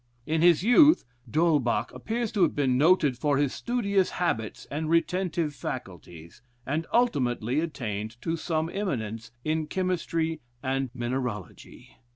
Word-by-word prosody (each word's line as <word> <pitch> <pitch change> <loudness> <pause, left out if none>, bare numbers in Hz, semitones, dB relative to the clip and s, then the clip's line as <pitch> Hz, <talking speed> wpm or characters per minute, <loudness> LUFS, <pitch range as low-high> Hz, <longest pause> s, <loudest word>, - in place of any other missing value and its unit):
In 160 +1 0
his 170 -1 +5
youth, 290 +8 +6 0.2
D'Holbach 150 -3 +2
appears 230 0 -3
to 205 - -1
have 170 - +3
been 135 -3 +2
noted 150 -3 +3
for 145 -2 +2
his 140 -2 +1
studious 200 -6 0
habits 110 -12 -2
and 155 +2 -2
retentive 170 -1 +1
faculties, 90 - -8 0.2
and 155 +4 -2
ultimately 130 - +1
attained 120 -8 -4
to 165 - -1
some 160 -1 -1
eminence 115 - -3
in 155 0 -1
chemistry 165 -3 -1 0.2
and 135 0 -1
mineralogy. 120 - -5
155 Hz, 130 wpm, -27 LUFS, 125-175 Hz, 0.2 s, youth